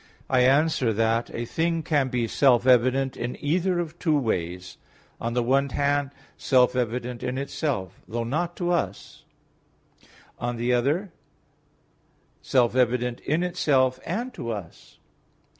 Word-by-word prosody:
I 130 - +4
answer 135 -1 +3
that, 115 +2 +1
A 120 - -4
thing 165 +5 -1
can 145 -4 +1
be 125 -2 -1
self 125 0 +3
evident 130 +1 +3
in 120 +1 -4
either 175 +5 0
of 175 0 -5
two 155 -3 +2
ways: 90 -7 -3 0.4
on 115 +1 -3
the 125 - +2
one 135 +3 +2
hand, 145 +1 0 0.3
self 125 -2 +3
evident 125 0 -2
in 125 +1 -3
itself, 130 - -3
though 115 +1 -3
not 165 +8 -2
to 175 -1 -1
us; 175 - -3 1.1
on 120 0 -2
the 120 +2 0
other, 150 +11 0 1.3
self 125 -2 +2
evident 125 -1 +1
in 160 +4 -1
itself, 135 -8 +1
and 235 +9 -3
to 115 - -6
us. 100 -7 -8
130 Hz, 140 wpm, -25 LUFS, 120-150 Hz, 1.3 s, I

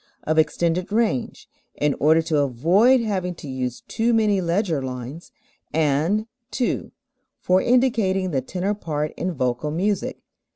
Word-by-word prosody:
of 155 +1 +1
extended 170 +4 0
range, 215 - -1 0.3
in 145 -1 +1
order 160 +2 +4
to 160 -2 0
avoid 175 - +3
having 185 -5 -2
to 150 - -10
use 130 -2 -4
too 230 +1 +1
many 210 -3 +2
leger 170 -3 0
lines; 130 +5 -7 0.4
and 160 +7 +1 0.2
(2) 250 - -2 0.5
for 185 +1 +2
indicating 225 -7 +2
the 135 -3 0
tenor 185 +9 -2
part 155 -7 -3
in 180 - -2
vocal 130 -1 -1
music. 190 +5 -2
170 Hz, 135 wpm, -23 LUFS, 150-205 Hz, 0.5 s, order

